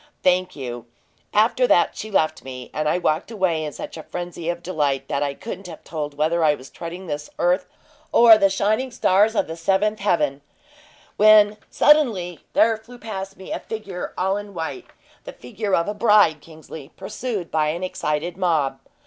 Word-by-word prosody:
"Thank 185 0 +2
you! 120 -4 -7 0.4
After 230 +4 +3
that 175 - +3
she 215 - -6
left 155 -6 0
me, 130 -1 -9
and 155 0 0
I 175 - +2
walked 160 0 0
away 185 -8 0
in 150 - -4
such - - -8
a - - -6
frenzy 175 0 -6
of 175 0 -3
delight 145 -6 -1
that 140 - -1
I 140 -1 -1
couldn't 195 -1 -7
have 165 -3 -10
told 150 -3 -5
whether 160 +3 +1
I 150 -1 +4
was 130 -1 -13
treading 175 +3 -7
this 150 -2 -5
earth 180 +1 +1 0.4
or 235 -1 +8
the 200 -2 +3
shining 215 +7 0
stars 215 -1 +2
of - - +2
the 160 - -6
seventh 195 +5 +1
heaven, 150 -8 0 0.8
when 210 0 +6
suddenly 220 - +3
there 225 0 +4
flew 235 +3 -14
past 195 -4 -6
me 190 - -10
a - - -2
figure 200 -5 -6
all 190 +2 +1
in 205 -1 -8
white 170 - -5 0.4
the - - -8
figure 210 -3 -2
of 170 - 0
a 205 - -1
bride, 210 -8 +4
Kingsley, 155 -2 -11
pursued 205 -1 -5
by 155 -1 +1
an 170 +4 -2
excited 165 -1 -2
mob. 155 -8 0
180 Hz, 185 wpm, -22 LUFS, 155-210 Hz, 0.8 s, or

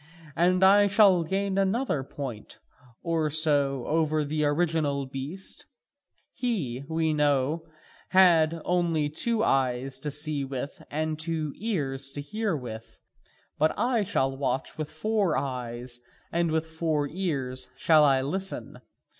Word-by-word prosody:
And 180 +3 +3
I 205 +2 +7
shall 195 -4 +5
gain 195 +3 -1
another 195 - +1
point 130 -5 -7 0.5
or 165 -2 0
so 145 -4 +2
over 155 -1 +1
the 150 +1 -1
original 145 -2 0
beast: 140 +8 -7 0.7
he, 155 - -2
we 160 -1 +1
know, 150 +2 +1 0.4
had 170 -4 +4
only 170 -4 +1
two 225 +7 0
eyes 130 - 0
to 150 - -4
see 145 0 0
with 135 +1 -5
and 155 +1 -2
two 160 -2 -2
ears 140 -11 -2
to 145 - -5
hear 210 +2 -2
with, 115 -4 -9 0.6
but 155 +1 +2
I 240 +1 +2
shall 135 -9 0
watch 135 -1 -2
with 155 -1 -4
four 200 0 0
eyes 125 -2 -4 0.3
and 170 0 +1
with 160 0 0
four 160 -2 -1
ears 140 -7 -2
I - - -31
shall 145 -5 +4
listen. 190 +7 -3
155 Hz, 130 wpm, -27 LUFS, 135-175 Hz, 0.7 s, I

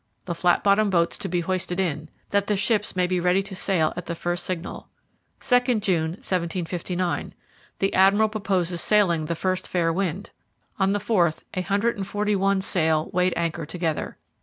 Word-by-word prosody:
The 175 - -2
flat 175 +1 +2
bottomed 205 +1 +4
boats 170 -3 +2
to 195 - -4
be 175 0 0
hoisted 180 +1 -2
in, 155 -4 -2 0.2
that 200 0 +1
the 210 - +1
ships 210 +1 0
may 180 -1 +2
be 180 0 0
ready 180 +2 +2
to 195 0 -8
sail 180 -4 +1
at 180 - -6
the 170 - -3
first 175 +1 -2
signal.' 180 -1 -5 0.5
'2nd 245 -3 +2
June, 170 -6 +1
1759. 180 0 -2 0.4
The 195 - 0
Admiral 200 +3 +5
purposes 190 -5 -1
sailing 175 -7 +3
the 170 +2 -2
first 185 +2 -1
fair 165 -2 +1
wind.' 190 +1 -2 0.5
On 195 0 +3
the - - +1
4th 180 -6 +1
a 185 - -1
hundred 205 +5 0
and 195 -1 -4
forty 205 +1 0
one 195 0 +2
sail 160 -4 +1
weighed 180 0 +2
anchor 170 -1 -1
together. 165 -4 -3
185 Hz, 180 wpm, -24 LUFS, 170-200 Hz, 0.5 s, Admiral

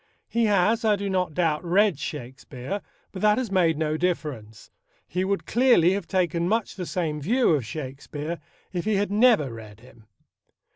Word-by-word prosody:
He 230 0 +1
has, 210 +3 +2
I 215 -2 +4
do 200 0 -3
not 180 -5 -1
doubt, 160 -3 +1
read 185 -2 +2
Shakespeare, 130 +4 -6 0.3
but 190 - -7
that 210 0 +4
has 250 -5 -2
made 170 -5 +3
no 155 0 -1
difference, 145 -11 -3 0.4
He 180 +2 -1
would 195 +1 -1
clearly 235 -8 +4
have 200 - -3
taken 175 -2 0
much 225 0 0
the 180 -3 -6
same 155 -4 -2
view 235 - +2
of 140 -8 0
Shakespeare 145 +4 -6 0.3
if 175 -2 -2
he 215 -1 +1
had 200 0 0
never 210 - +4
read 110 -1 -11
him. 115 -3 -18
175 Hz, 175 wpm, -25 LUFS, 150-205 Hz, 0.4 s, I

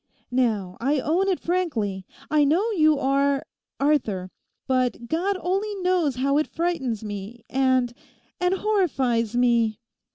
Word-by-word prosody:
Now, 215 -8 0
I 280 +4 +2
own 340 +8 +1
it 375 -3 +1
frankly, 230 - -2 0.2
I 305 -1 +4
know 350 +11 +2
you 310 -6 +4
are—Arthur. 275 -6 0 0.3
But 255 -2 0
God 370 +8 0
only 395 +4 -1
knows 355 -7 +2
how 275 +3 +2
it 305 - 0
frightens 295 -11 -2
me, 210 +2 -7
and—and—horrifies 260 - 0
me. 235 -3 +2
275 Hz, 110 wpm, -24 LUFS, 235-345 Hz, 0.3 s, I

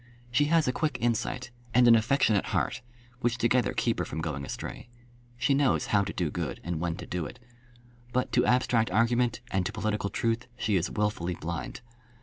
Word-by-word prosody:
She 145 +4 +3
has 160 -1 +3
a 125 - +1
quick 150 -3 -1
insight, 120 +1 -1 0.2
and 125 0 +6
an 120 - +9
affectionate 115 -2 +3
heart, - - -1 0.4
which 120 -1 0
together 125 +1 +2
keep - - 0
her - - +1
from 80 - -5
going 75 -4 -3
astray. 90 - -6 0.5
She 125 +3 +2
knows 135 -2 +2
how 100 -1 +5
to 100 - -4
do 85 -5 -2
good, - - -3
and 85 -2 -3
when 85 0 -1
to - - -8
do 85 -4 -3
it. - - -12 0.7
But 125 +1 0
to - - +3
abstract 125 -2 +2
argument, 115 +3 +2
and 95 -1 +1
to - - -4
political 110 -2 -1
truth, 115 +3 -1
she 110 -4 0
is 90 -2 +1
wilfully 105 -4 -1
blind. 80 -3 -5
115 Hz, 190 wpm, -28 LUFS, 90-125 Hz, 0.7 s, an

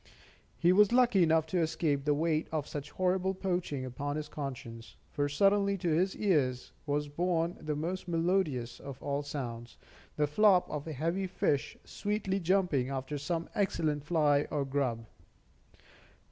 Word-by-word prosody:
He 170 +9 +4
was 210 +2 +5
lucky 245 -5 +4
enough 160 -1 +4
to 175 +3 -1
escape 160 -4 0
the 145 -1 +3
weight 155 +1 0
of 155 -2 -2
such 145 0 -6
horrible 185 +1 0
poaching 175 -8 -2
upon 140 +3 -4
his 155 -1 -4
conscience; 125 -5 -7 0.2
for 145 -1 -1
suddenly 200 +5 +3
to 175 -2 -1
his 180 +5 +1
ears 140 -11 +1 0.2
was 145 +1 0
borne 170 +2 0
the 155 -1 -2
most 175 +5 -3
melodious 165 -8 0
of 140 -2 -8
all 140 0 -1
sounds, 120 -5 -6 0.4
the 150 - +2
flop 185 +4 +4
of 150 0 -4
a 160 - -4
heavy 170 +7 -1
fish 145 -5 -1
sweetly 205 -2 -2
jumping 175 -8 +1
after 135 +2 -4
some 165 +3 -2
excellent 155 -7 0
fly 150 -2 +2
or 145 -2 -1
grub. 130 -5 -1
155 Hz, 155 wpm, -31 LUFS, 140-180 Hz, 0.4 s, was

